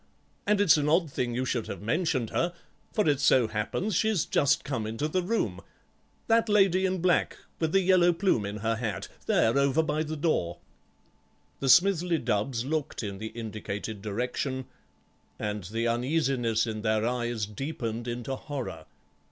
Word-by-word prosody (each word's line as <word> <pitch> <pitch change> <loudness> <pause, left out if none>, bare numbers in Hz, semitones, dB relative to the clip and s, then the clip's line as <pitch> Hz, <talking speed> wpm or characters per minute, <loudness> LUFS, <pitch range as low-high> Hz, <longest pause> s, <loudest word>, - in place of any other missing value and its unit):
And 210 0 +3
it's 200 -6 +6
an 150 0 +1
odd 165 -1 +2
thing 120 -2 -2
you 130 +1 -1
should 120 -3 -2
have 100 - -6
mentioned 130 - 0
her, 175 +1 0 0.4
for 210 -5 +1
it 145 -3 +3
so 130 -4 +4
happens 110 - -2
she's 215 -3 +2
just 140 - +2
come 125 -6 -3
into 115 +7 -2
the 185 +4 0
room. 175 - -1 0.6
That 225 0 +3
lady 190 -2 +4
in 185 -1 -2
black, 180 -1 +2 0.2
with 160 -1 0
the 195 - +4
yellow 180 -1 +5
plume 170 - +1
in 100 +1 -4
her 115 0 +1
hat, 110 -3 -4 0.2
there 115 - +3
over 140 +3 +3
by 155 0 -1
the 155 0 -3
door." 145 - 0 1.0
The 135 - -1
Smithly 180 +1 +5
Dubbs 115 0 -1
looked 150 -3 -2
in 100 -2 -5
the 110 - -4
indicated 110 -2 -6
direction, 125 +5 -3 0.7
and 105 -2 -3
the 115 +5 -2
uneasiness 120 -2 +1
in 110 -2 -4
their 110 0 +1
eyes 120 -3 -1
deepened 115 0 -4
into 120 +2 -3
horror. 130 - -6
130 Hz, 165 wpm, -28 LUFS, 110-165 Hz, 1.0 s, it's